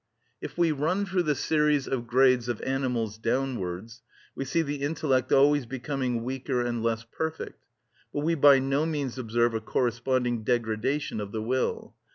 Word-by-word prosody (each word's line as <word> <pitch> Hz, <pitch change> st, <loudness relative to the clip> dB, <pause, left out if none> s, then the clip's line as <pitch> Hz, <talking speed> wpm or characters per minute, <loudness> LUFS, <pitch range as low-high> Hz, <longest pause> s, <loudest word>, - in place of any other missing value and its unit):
If -, -, -7 dB
we 170 Hz, -2 st, +3 dB
run 160 Hz, +8 st, 0 dB
through 190 Hz, -1 st, 0 dB
the 150 Hz, -4 st, +1 dB
series 150 Hz, -2 st, +1 dB
of 120 Hz, -3 st, -2 dB
grades 125 Hz, -1 st, +3 dB
of 120 Hz, -, -2 dB
animals 125 Hz, -5 st, -1 dB
downwards, 115 Hz, -3 st, -2 dB, 0.3 s
we 135 Hz, -, -4 dB
see 165 Hz, +5 st, +1 dB
the 145 Hz, -2 st, -4 dB
intellect 140 Hz, -4 st, 0 dB
always 140 Hz, -1 st, +4 dB
becoming 125 Hz, -1 st, -2 dB
weaker 130 Hz, 0 st, -2 dB
and 120 Hz, -1 st, -1 dB
less 115 Hz, 0 st, -1 dB
perfect, 160 Hz, +7 st, -5 dB, 0.5 s
but 145 Hz, -, -2 dB
we 165 Hz, +3 st, +1 dB
by 145 Hz, -3 st, +7 dB
no 135 Hz, +4 st, 0 dB
means 140 Hz, -5 st, -3 dB
observe 120 Hz, 0 st, +1 dB
a 110 Hz, -, -2 dB
corresponding 120 Hz, 0 st, 0 dB
degradation 115 Hz, +2 st, -1 dB
of 100 Hz, -1 st, -6 dB
the 110 Hz, -, -3 dB
will. 130 Hz, +3 st, -1 dB
130 Hz, 165 wpm, -27 LUFS, 120-145 Hz, 0.5 s, by